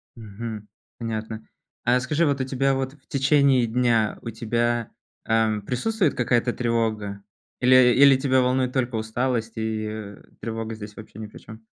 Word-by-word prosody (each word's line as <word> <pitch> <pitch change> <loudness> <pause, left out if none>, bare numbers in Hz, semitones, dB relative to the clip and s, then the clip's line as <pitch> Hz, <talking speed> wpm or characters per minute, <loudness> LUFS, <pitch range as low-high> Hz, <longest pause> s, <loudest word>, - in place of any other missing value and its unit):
Мгм. 110 -1 -7 0.3
Понятно. 110 -1 -5 0.4
А 125 +1 +3
скажи, 150 +6 +1
вот 140 -2 0
у - - +1
тебя 135 +1 +1
вот 135 0 -3
в 150 - -24
течение 140 -3 +3
дня, 115 -2 +1
у - - -6
тебя, 115 0 -1 0.3
ам, 110 -2 +1
присутствует 170 - 0
какая-то 120 0 +1
тревога? 110 -4 -1 0.4
Или 125 -1 +6
или 140 0 +7
тебя 130 -1 +2
волнует 125 0 +1
только 125 -2 -1
усталость, 115 +1 -1
и, 110 -1 -2
э, 105 -2 -7 0.2
тревога 115 0 -4
здесь 105 -1 -9
вообще 110 -1 -11
ни 110 - -6
при - - -13
чём? 110 0 -13
120 Hz, 160 wpm, -24 LUFS, 110-130 Hz, 0.4 s, или